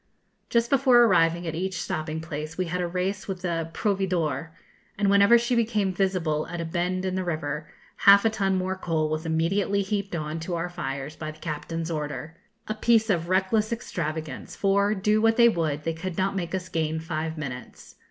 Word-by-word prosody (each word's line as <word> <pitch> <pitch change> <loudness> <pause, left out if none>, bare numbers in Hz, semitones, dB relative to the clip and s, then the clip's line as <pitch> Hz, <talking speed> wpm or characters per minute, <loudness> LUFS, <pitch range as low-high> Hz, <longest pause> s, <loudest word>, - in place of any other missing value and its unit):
Just 235 0 +1
before 260 -3 +6
arriving 175 -5 +3
at 165 - -3
each 185 +1 -3
stopping 155 0 -3
place, 155 -1 -6
we 185 - 0
had 180 +2 -2
a 175 - 0
race 185 +3 -2
with 185 -2 -5
the 165 -2 -2
'Proveedor,' 175 - -1 0.5
and 200 -1 +2
whenever 200 +4 +7
she 240 +1 0
became 215 -5 +1
visible 175 -5 0
at 175 - -5
a 165 - -2
bend 180 +3 -1
in 185 - -1
the 185 0 -1
river, 155 -3 -3 0.3
half 200 +1 +7
a 225 - +4
ton 195 -3 0
more 185 0 -1
coal 160 -4 -1
was 155 +1 -3
immediately 195 +5 +1
heaped 200 -1 -2
on 155 0 -3
to 170 +2 -3
our 170 +1 -2
fires 140 -2 -5
by 155 -1 -5
the 155 - -9
captain's 165 +1 -4
order 150 +1 -4 0.3
a 215 - -1
piece 225 0 +3
of 170 -2 -1
reckless 195 +4 +2
extravagance, 160 - -4
for, 200 +1 +2
do 210 +2 +2
what 225 0 +3
they 235 -1 +7
would, 155 -8 0
they 165 - -1
could 175 +1 -5
not 195 +1 0
make 175 -1 -2
us 185 -1 -4
gain 160 -2 -1
five 160 0 -4
minutes. 130 -5 -8
180 Hz, 195 wpm, -26 LUFS, 160-200 Hz, 0.5 s, whenever